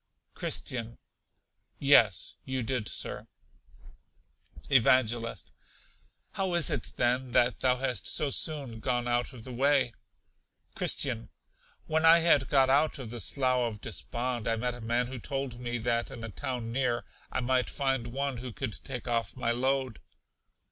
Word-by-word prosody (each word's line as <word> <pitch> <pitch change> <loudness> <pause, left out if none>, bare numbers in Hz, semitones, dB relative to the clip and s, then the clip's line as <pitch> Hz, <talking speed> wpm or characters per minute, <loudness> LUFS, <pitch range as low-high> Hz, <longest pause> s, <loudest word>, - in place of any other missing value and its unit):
Christian. 115 -1 -3 0.8
Yes, 115 -9 +4
you 130 -2 -2
did, 120 -3 -2
Sir. - - -4 1.4
Evangelist. 120 -2 +2 0.8
How 190 -2 -1
is 170 -5 +1
it, - - -3
then, 125 +1 +1
that 120 -4 +3
thou 125 +1 +3
hast 125 -5 -1
so 145 -2 +1
soon 140 -9 -1
gone 120 +1 -1
out 120 +2 0
of 120 -4 -11
the 130 - -7
way? 135 -1 +3 0.8
Christian. 115 -4 0 0.6
When 160 0 0
I 165 +1 +8
had 165 -5 +4
got 135 -2 +5
out 150 +4 +3
of 125 -5 -7
the 120 - -5
Slough 125 +2 +1
of 105 - -11
Despond 120 - -3
I 115 - +2
met 125 +2 -2
a 120 - -9
man 120 +2 +1
who 130 0 -7
told 135 0 -4
me 120 -1 -3
that 115 0 0
in 115 - -8
a 115 - -5
town 115 +1 -4
near, 120 -2 0 0.3
I - - -1
might 125 0 +1
find 135 -4 0
one 135 +1 -2
who 125 +1 -6
could 130 -2 -5
take 125 -3 -6
off 115 -4 -1
my 120 -2 0
load. 130 0 0
125 Hz, 155 wpm, -30 LUFS, 120-135 Hz, 1.4 s, I